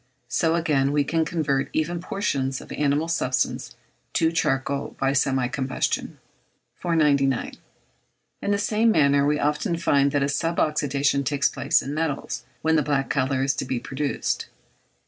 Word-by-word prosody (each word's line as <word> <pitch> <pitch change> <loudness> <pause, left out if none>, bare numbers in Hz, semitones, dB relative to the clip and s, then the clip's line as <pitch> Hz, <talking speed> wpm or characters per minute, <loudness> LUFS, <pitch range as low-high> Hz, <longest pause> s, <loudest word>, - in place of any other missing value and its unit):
So 160 +6 +1
again, 145 -5 +1
we 145 0 +2
can 160 +3 0
convert 140 -4 -1
even 170 +2 -1
portions 135 -8 -2
of - - -12
animal 145 +2 +1
substance 130 -6 -1 0.4
to 160 0 +2
charcoal 140 -3 -1
by 135 0 +1
semi 135 -2 +1
combustion. 130 +1 -2 0.6
499. 145 -6 +1 0.8
In - - -2
the 205 - +2
same 215 +2 +2
manner 140 -7 +4
we 150 0 +2
often 150 +5 0
find 140 -3 +2
that 145 -1 +1
a - - +1
sub 165 +4 -1
oxydation 140 -2 +1
takes 140 0 +1
place - - +1
in 140 - -4
metals 155 -2 -2 0.2
when 160 0 +3
the - - +3
black 140 -1 0
colour 130 -1 +1
is 135 - +2
to - - -1
be 130 -1 -2
produced. 140 +3 -2
145 Hz, 155 wpm, -24 LUFS, 135-160 Hz, 0.8 s, manner